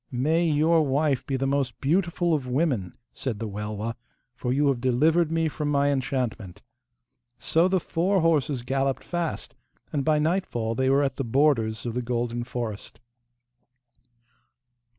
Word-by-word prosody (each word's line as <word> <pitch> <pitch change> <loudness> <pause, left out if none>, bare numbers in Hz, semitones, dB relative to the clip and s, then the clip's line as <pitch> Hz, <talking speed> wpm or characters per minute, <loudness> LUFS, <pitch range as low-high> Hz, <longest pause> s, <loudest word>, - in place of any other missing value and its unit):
'May 155 +7 +1
your 160 +2 +3
wife 140 -1 +1
be 135 - -1
the 135 - -1
most 135 -4 -1
beautiful 170 +3 +1
of 140 -5 -1
women,' 125 - 0 0.2
said 125 -6 -4
the 115 +1 -4
Welwa, 105 +2 -4 0.4
'for 125 0 -3
you 145 +3 +2
have 130 -3 -1
delivered 155 +6 +2
me 165 0 +1
from 150 -1 -3
my 140 0 +2
enchantment.' 125 -8 -3 0.7
So 165 +3 +2
the 185 0 +2
four 180 +3 0
horses 150 -6 +1
galloped 135 +1 -1
fast, 175 -2 -3 0.4
and 140 -2 0
by 155 +2 +3
nightfall 150 -9 0
they 130 +3 +1
were 140 +1 +4
at 135 - -2
the 135 - -1
borders 115 -4 +1
of 120 - -2
the 125 - -1
golden 120 0 -2
forest. 120 -4 -6
135 Hz, 150 wpm, -26 LUFS, 120-155 Hz, 0.7 s, were